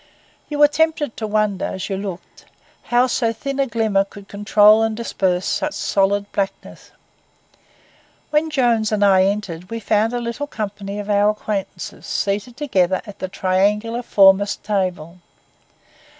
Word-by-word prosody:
You 295 - -3
were 295 0 +7
tempted 300 -3 0
to 220 - -3
wonder, 210 -2 0
as 190 +1 -4
you 195 - -2
looked, 190 -2 -8 0.4
how 245 +1 +3
so 235 -2 0
thin 275 +5 -5
a 275 - +2
glimmer 220 -4 +1
could 200 0 -14
control 210 +1 +4
and 225 -1 0
disperse 185 -6 -1
such 300 - -1
solid 200 +1 0
blackness. 195 -1 -4 1.4
When 305 +1 +2
Jones 240 -7 +1
and 205 -1 +2
I 190 -1 +5
entered 195 -3 -3
we 230 - -4
found 215 +2 +1
a 245 - -1
little 235 +5 -4
company 205 -4 -5
of 205 -1 -5
our 205 0 +3
acquaintances 210 -2 -5
seated 205 +5 -2
together 190 -11 0
at 205 -2 -11
the 190 - -3
triangular 205 +5 0
foremost 200 -3 +4
table. 180 -4 -2
210 Hz, 150 wpm, -20 LUFS, 195-235 Hz, 1.4 s, were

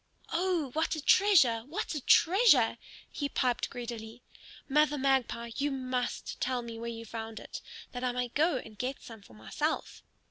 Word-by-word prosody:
"Oh, 340 -5 0
what 315 +4 0
a - - -4
treasure! 295 - +5
What 315 - -3
a 300 - -3
treasure!" 330 - +5 0.3
he 285 -2 -3
piped 250 -3 0
greedily. 235 -1 -7 0.4
"Mother 300 +1 +3
Magpie, 260 -3 0
you 290 +1 +1
must 255 -2 -3
tell 250 -1 0
me 230 -1 -7
where 235 0 -4
you 230 0 -7
found 225 0 -6
it, - - -8 0.3
that 245 0 -6
I 250 - +1
may 245 0 -2
go 305 +3 +2
and 215 -4 -10
get 260 +2 -3
some 225 -3 -11
for 115 - -17
myself." 110 -1 -3
250 Hz, 170 wpm, -30 LUFS, 230-295 Hz, 0.4 s, treasure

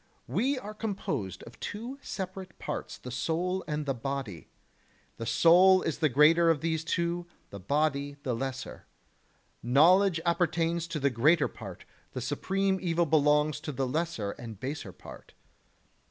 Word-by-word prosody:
We 270 +3 0
are 215 -4 -7
composed 155 - -4
of 115 - -13
two 240 +6 -6
separate 190 -4 -6
parts, - - -5
the 125 - -9
soul 175 +8 -1
and 150 -1 -2
the 135 - 0
the 125 - -12
body; 130 - -5 0.7
the 115 - -5
soul 185 +6 +6
is 160 - -2
the 155 -2 +3
greater 160 +5 +5
of 160 -4 +2
these 160 -1 -1
two, 170 +1 -1 0.2
the 100 - -7
body 145 +5 0
the 125 - -1
lesser. 130 +2 -5 0.7
Knowledge 165 - +5
appertains 170 -1 +1
to 165 -2 -3
the 140 0 +2
greater 150 +7 +4
part, 100 -6 -10 0.3
the - - -3
supreme 190 +9 0
evil 170 -1 +1
belongs 150 -1 +3
to 150 0 -5
the 135 -1 -1
lesser 130 -7 -2
and 115 -3 -9
baser 130 -7 -5
part. - - -13
155 Hz, 155 wpm, -29 LUFS, 135-175 Hz, 0.7 s, soul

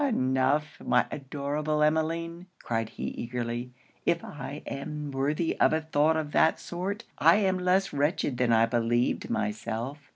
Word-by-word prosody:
'Enough, 140 - +1
my 125 - +3
adorable 150 +2 -1
Emmeline!' 165 +3 0 0.2
cried 115 -1 -1
he - - -4
eagerly, 120 +1 -4 0.3
'if 170 0 +1
I 140 +1 -7
am 150 +1 -5
worthy 145 +5 0
of - - +5
a 160 - +1
thought 155 0 +2
of 150 -2 -3
that 160 - +3
sort, 195 +5 -4 0.2
I - - +7
am 190 -3 +2
less 185 +2 +2
wretched 145 -2 0
than 125 -2 +3
I 115 0 +5
believed 120 +1 0
myself. 115 +6 -3
145 Hz, 150 wpm, -28 LUFS, 125-160 Hz, 0.3 s, I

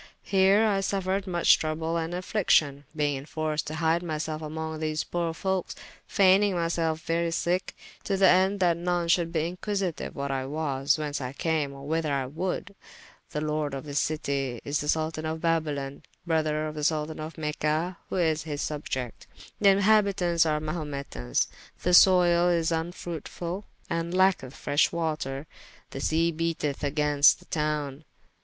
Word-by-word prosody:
Heere 195 +2 +5
I 200 -2 +1
suffered 195 0 -1
muche 175 -2 +4
trouble 160 +1 -2
and 165 +1 -2
affliction, 160 -7 +1
beyng 145 -2 +1
enforced 155 +1 -3
to 155 - -4
hyde 165 +1 +1
myselfe 155 -2 -3
among 160 0 -5
these 155 0 -1
poore 170 -1 -2
folkes, 190 0 -2 0.3
fayning 195 0 +4
myselfe 165 -2 0
very 170 +1 0
sicke, 175 +2 -1 0.3
to 195 - 0
the 190 0 +6
ende 190 +2 +4
that 175 -2 +3
none 175 0 -1
should 170 -1 +2
be 160 -2 0
inquisityue 195 -3 -3
what 140 -1 -3
I 135 -1 -2
was, 140 -2 0
whence 150 -2 -3
I 125 0 -4
came, 155 -2 -1
or 140 0 -10
whyther 160 0 -1
I 135 -2 0
would. 180 +7 -4 0.6
The 150 - -3
lord 150 -2 -1
of 135 - -5
this 145 -1 -1
citie 140 -6 -1
is 145 +1 0
the 150 - -4
Soltan 155 0 0
of 160 +1 -3
Babylon, 150 -4 -1 0.2
brother 155 -2 0
to 155 - -4
the 150 -1 -5
Soltan 155 0 0
of 155 +1 -6
Mecha, 155 +3 -1
who - - -3
is 160 -4 +1
his 150 -2 -4
subiecte. 130 -5 -4 0.3
The 200 - +6
inhabitauntes 195 -4 +3
are 150 0 +1
Mahumetans. 145 - -2 0.4
The 180 - +1
soyle 175 -1 +6
is 170 -1 +1
vnfruitfull, 170 +2 -4 0.2
and 170 +1 -2
lacketh 185 -8 +2
freshe 145 +1 +2
water. 155 -4 -2 0.5
The 135 - -5
sea 165 +3 +2
beateth 160 -3 -2
agaynst 145 0 +4
the - - -19
towne. 150 -2 -2
160 Hz, 160 wpm, -27 LUFS, 150-175 Hz, 0.6 s, the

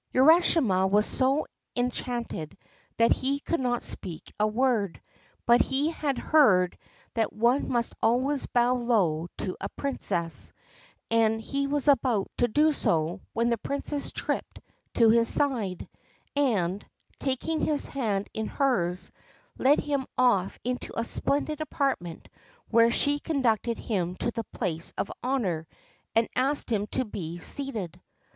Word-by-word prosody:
Urashima 260 - +5
was 210 +2 +3
so 270 +3 +1 0.3
enchanted 245 -9 -3 0.4
that 230 0 +4
he 275 +2 +1
could 335 +3 -2
not 245 -2 -1
speak 170 -4 -5
a 210 - +3
word; 220 -5 0 0.5
but 240 +1 +6
he 280 +4 +1
had 290 -4 -2
heard 190 - +4 0.4
that 225 -2 0
one 240 +5 +1
must 235 -2 0
always 260 +5 +1
bow 245 +1 +3
low 205 -10 +1
to 185 - -2
a 195 - -3
Princess, 175 - -2 0.6
and 225 -1 +3
he 275 +5 -2
was 290 0 -1
about 245 -7 +2
to 245 - +3
do 300 +6 +3
so 170 - 0
when 235 +1 +1
the 235 - 0
Princess 280 +2 -3
tripped - - -3 0.4
to 230 -2 +6
his 230 0 +4
side, 230 -11 +1 0.5
and, 205 -9 +1 0.4
taking 285 +4 -1
his 295 -2 +1
hand 210 -7 -2
in 220 0 -3
hers, 185 -10 0 0.5
led 280 +3 +4
him 280 -3 -2
off 220 -7 +2
into 250 -1 -3
a - - +1
splendid 290 +5 -1
apartment, 270 - -2 0.4
where 230 0 +5
she 285 +4 +1
conducted 240 -7 0
him 180 -5 -2
to 235 - -2
the 230 -1 -4
place 170 -7 -3
of - - -2
honour 195 -12 -1 0.5
and 225 0 +3
asked 270 0 +1
him 210 -2 0
to 255 - -1
be 175 -6 -6
seated. 190 - -5
235 Hz, 140 wpm, -27 LUFS, 200-275 Hz, 0.6 s, but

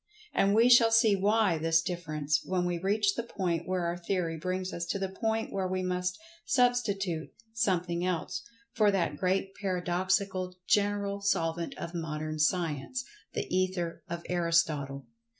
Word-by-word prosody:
And 200 +1 +3
we 230 +2 +6
shall 240 -2 +7
see 225 -2 +5
why 200 -3 +2
this 165 +1 +3
difference, 155 -4 -1
when 180 -1 -1
we 175 -1 -1
reach 200 +2 +2
the 235 - -2
point 180 -7 -2
where 185 -1 0
our 170 0 -1
theory 170 -2 -1
brings 185 +3 -3
us 170 - -3
to - - -1
the 195 -1 -2
point 225 0 0
where 190 -1 -1
we 185 0 -2
must 180 0 -1 0.3
substitute 210 - +1 0.2
"something 180 -6 0
else" 180 -3 -2 0.3
for 215 -3 +4
that 175 -7 +1
Great 190 +3 0
Paradoxical 185 0 -1
General 200 -1 +1
Solvent 165 -4 -1
of 170 - -6
Modern 155 -2 -4
Science—the 180 - -2
Ether 185 -2 -1
of 170 0 -4
Aristotle. 165 -6 +1
185 Hz, 150 wpm, -30 LUFS, 170-200 Hz, 0.3 s, shall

